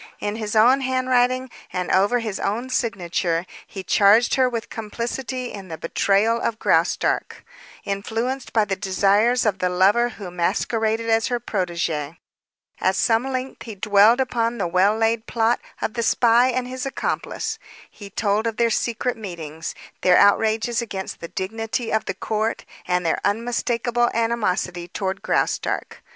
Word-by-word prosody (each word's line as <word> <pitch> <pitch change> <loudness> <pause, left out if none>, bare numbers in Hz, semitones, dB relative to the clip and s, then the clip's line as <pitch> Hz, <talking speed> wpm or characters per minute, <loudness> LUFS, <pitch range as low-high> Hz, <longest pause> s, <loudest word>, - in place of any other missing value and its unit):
In 205 +1 -3
his 215 -1 -4
own 245 +5 +5
handwriting 255 0 +1 0.2
and 180 0 -2
over 200 +6 +3
his 220 -4 -3
own 235 +6 -2
signature 180 -7 -1 0.2
he 190 - -7
charged 205 +5 +4
her 260 -2 +3
with 230 -2 -5
complicity 240 +3 -4
in 195 -2 -8
the 160 -2 -6
betrayal 200 +7 +1
of 225 - -1
Graustark, 165 -4 0 0.4
influenced 225 +6 -3
by 220 -2 +3
the 195 -1 -1
desires 205 +5 +2
of 205 -3 +1
the 180 - +1
lover 200 +7 +3
who 190 -4 -7
masqueraded 220 +6 0
as 225 0 +2
her 245 -2 -1
protege. 170 -7 -2 0.6
At - - +1
some 235 +3 +1
length 255 0 -4
he 225 -3 -7
dwelt 210 +4 +4
upon 240 -2 0
the 200 - -1
well 185 +5 +3
laid 225 0 0
plot 230 0 +1 0.2
of 220 - -1
the 235 - -2
spy 235 +1 +4
and 255 0 -1
his 255 0 -5
accomplice. 270 - -3 0.3
He 200 -2 -11
told 210 +2 0
of 225 - -3
their 235 -1 +2
secret 235 +2 -1
meetings, 165 -6 -7 0.3
their 180 -1 +5
outrages 225 +3 +3
against 195 -5 -6
the 170 - -6
dignity 225 +5 -3
of 220 - +1
the 195 - -3
court, 220 +3 -2 0.2
and 180 -1 0
their 165 - 0
unmistakable 240 +2 0
animosity 195 -7 -1
toward 190 +1 -3
Graustark. - - -1
220 Hz, 155 wpm, -22 LUFS, 195-235 Hz, 0.6 s, own